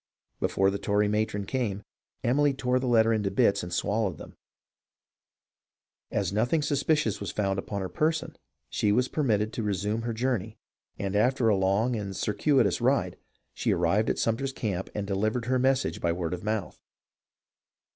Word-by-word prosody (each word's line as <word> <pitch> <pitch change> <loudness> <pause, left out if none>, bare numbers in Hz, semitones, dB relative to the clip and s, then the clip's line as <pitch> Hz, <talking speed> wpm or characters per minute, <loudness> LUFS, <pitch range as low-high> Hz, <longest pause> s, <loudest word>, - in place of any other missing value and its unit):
Before 95 0 +2
the 100 - -3
Tory 105 +1 +1
matron 105 -1 -1
came, 105 -5 -2 0.4
Emily 140 +3 +2
tore 130 -1 +1
the 130 - -2
letter 115 -2 +4
into 105 -3 0
bits 100 +1 +2
and 90 - -7
swallowed 100 -1 0
them. - - -11 1.7
As 100 -2 -1
nothing 120 +9 +1
suspicious 145 -5 +1
was - - -4
found 95 -2 -1
upon 100 +1 -4
her 95 - -2
person 155 - -1 0.3
she 105 - 0
was 125 +4 +2
permitted 110 -8 0
to - - -3
resume 105 +2 -1
her 115 0 -3
journey, 110 -3 -2 0.4
and 100 0 -3
after 120 +2 +3
a 105 - +4
long 100 +6 +1
and 100 -3 -4
circuitous 125 +8 +1
ride 120 -8 +1 0.4
she - - 0
arrived 90 +6 +2
at - - 0
Sumter's 130 +4 0
camp 95 -7 -3
and 105 -1 -2
delivered 110 +4 -1
her 130 +1 +1
message 130 +1 +1
by 85 - +1
word 85 -1 -2
of 90 - -5
mouth. 105 -3 -3
110 Hz, 165 wpm, -27 LUFS, 100-125 Hz, 1.7 s, letter